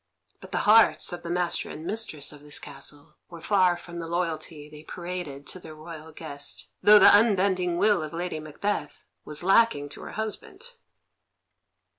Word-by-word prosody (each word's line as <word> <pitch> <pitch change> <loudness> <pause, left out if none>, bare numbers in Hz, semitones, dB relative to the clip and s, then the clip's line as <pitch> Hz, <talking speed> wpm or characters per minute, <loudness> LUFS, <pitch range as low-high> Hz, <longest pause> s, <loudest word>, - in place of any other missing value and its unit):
But - - -13
the - - -1
hearts 215 -3 +5
of 175 - -6
the 170 - -7
master 175 0 +1
and 155 - -8
mistress 185 -9 -2
of 145 - -14
this 145 0 -7
castle 145 0 -8
were 170 -1 -10
far 185 -1 +2
from 170 0 -9
the 165 - -5
loyalty 165 -3 -3
they 150 0 -13
paraded 170 -4 -7
to 185 - -6
their 160 -3 -11
royal 160 0 -10
guest, 145 -3 -5
though 210 0 +8
the 205 - +8
unbending 190 -5 +2
will 205 -1 +3
of 155 -1 -5
Lady 170 -1 -4
Macbeth 155 +1 -4 0.2
was 150 +2 -7
lacking 190 -7 +3
to - - -11
her - - -9
husband. 220 - -6
170 Hz, 170 wpm, -26 LUFS, 155-190 Hz, 0.2 s, though